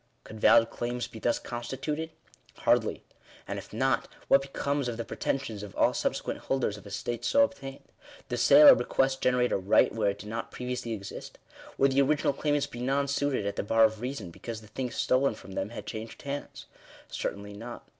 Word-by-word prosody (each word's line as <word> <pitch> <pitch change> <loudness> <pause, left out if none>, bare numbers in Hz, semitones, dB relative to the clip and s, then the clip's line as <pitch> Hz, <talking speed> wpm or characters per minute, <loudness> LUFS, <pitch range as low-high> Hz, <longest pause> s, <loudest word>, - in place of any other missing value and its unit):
Could 110 - -10
valid 115 +2 +5
claims 120 0 -3
be 110 - -10
thus 120 +1 +1
consti 120 +2 -6
tuted? 155 +3 -3 0.5
Hardly. - - +1 0.4
And - - -3
if - - -12
not, - - +1 0.2
what 135 - +6
becomes 140 0 -2
of 120 -2 -3
the 115 - -4
pretensions 115 -6 -3
of 105 -2 -9
all - - +3
subsequent - - -2
holders 130 -6 -1
of 105 0 -12
estates 110 +4 -3
so 280 - +5
obtained? 135 - -4 0.4
Does - - -2
sale 295 0 +9
or - - +11
bequest 135 - 0
generate 125 -1 +2
a - - +2
right 95 +2 +3
where 110 -3 +1
it 100 - -3
did 105 +1 -9
not 115 +1 -4
previously 125 -2 -4
exist? 100 -3 -8 0.4
Would 135 0 +4
the 135 +1 +4
original 145 +1 +2
claimants 145 0 0
be 120 - -9
nonsuited 140 -2 0
at 100 0 -3
the - - +1
bar 115 +2 +4
of 110 0 +2
reason, 125 -8 -5
because 115 +5 -7
the 105 - -15
thing 125 +4 -3
stolen 130 0 +1
from 100 - -12
them 95 +1 -3
had 120 - -8
changed 110 0 -7
hands? 140 0 -6 0.4
Certainly 100 +1 -5
not. 115 +4 -9
120 Hz, 195 wpm, -29 LUFS, 110-135 Hz, 0.5 s, or